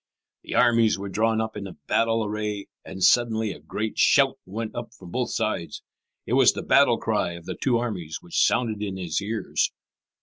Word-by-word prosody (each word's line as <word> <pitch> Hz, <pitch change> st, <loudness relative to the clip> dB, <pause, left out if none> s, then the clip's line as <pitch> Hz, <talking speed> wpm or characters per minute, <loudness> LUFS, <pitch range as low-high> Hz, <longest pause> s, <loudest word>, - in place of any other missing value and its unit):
The -, -, -6 dB
armies 115 Hz, -3 st, +4 dB
were 100 Hz, 0 st, -6 dB
drawn 110 Hz, +3 st, +1 dB
up 110 Hz, 0 st, -3 dB
in 100 Hz, -2 st, -5 dB, 0.2 s
battle 115 Hz, -1 st, +1 dB
array, 105 Hz, -1 st, -3 dB, 0.2 s
and 95 Hz, -1 st, -6 dB
suddenly 110 Hz, -3 st, +3 dB
a 80 Hz, -, -9 dB
great 105 Hz, +8 st, -4 dB
shout -, -, +4 dB
went 110 Hz, +3 st, -5 dB
up 120 Hz, 0 st, -7 dB
from 90 Hz, -2 st, -12 dB
both 125 Hz, +3 st, -1 dB
sides. 110 Hz, -8 st, -3 dB, 0.4 s
It -, -, -3 dB
was -, -, +6 dB
the -, -, -5 dB
battle -, -, +4 dB
cry 85 Hz, -, -1 dB
of 85 Hz, -1 st, -10 dB
the -, -, -4 dB
two 125 Hz, -3 st, +1 dB
armies 95 Hz, -10 st, -4 dB
which 85 Hz, -, 0 dB
sounded 110 Hz, -4 st, +1 dB
in 100 Hz, -2 st, -3 dB
his 90 Hz, -2 st, -2 dB
ears. 110 Hz, +2 st, -1 dB
110 Hz, 190 wpm, -25 LUFS, 95-115 Hz, 0.4 s, was